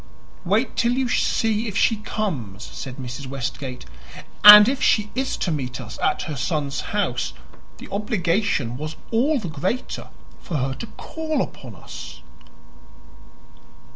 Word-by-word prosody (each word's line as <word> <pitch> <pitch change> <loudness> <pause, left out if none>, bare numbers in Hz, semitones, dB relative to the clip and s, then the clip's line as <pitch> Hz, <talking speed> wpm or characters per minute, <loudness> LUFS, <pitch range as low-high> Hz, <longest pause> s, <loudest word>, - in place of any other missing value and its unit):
"Wait 210 +8 +1
till 235 0 +2
you 260 0 0
see 225 -2 +1
if 200 -2 -3
she 225 - +3
comes," 135 - -4
said 130 -2 -7
Mrs. 130 +1 -7
Westgate. 130 - -5 0.6
"And 210 +1 +12
if 270 +1 0
she 210 -1 +2
is 265 +1 -2
to 175 - -1
meet 130 -5 -3
us 120 -3 -8
at - - +1
her 155 - -5
son's 145 0 -2
house 190 - -1 0.4
the - - -10
obligation 190 - 0
was 155 +2 -5 0.2
all 270 +7 +2
the 215 -8 -4
greater 175 - -3 0.3
for 165 - -4
her 135 0 -1
to 130 - -7
call 315 -3 -3
upon 120 -6 -10
us." - - -10
180 Hz, 140 wpm, -23 LUFS, 135-220 Hz, 0.6 s, And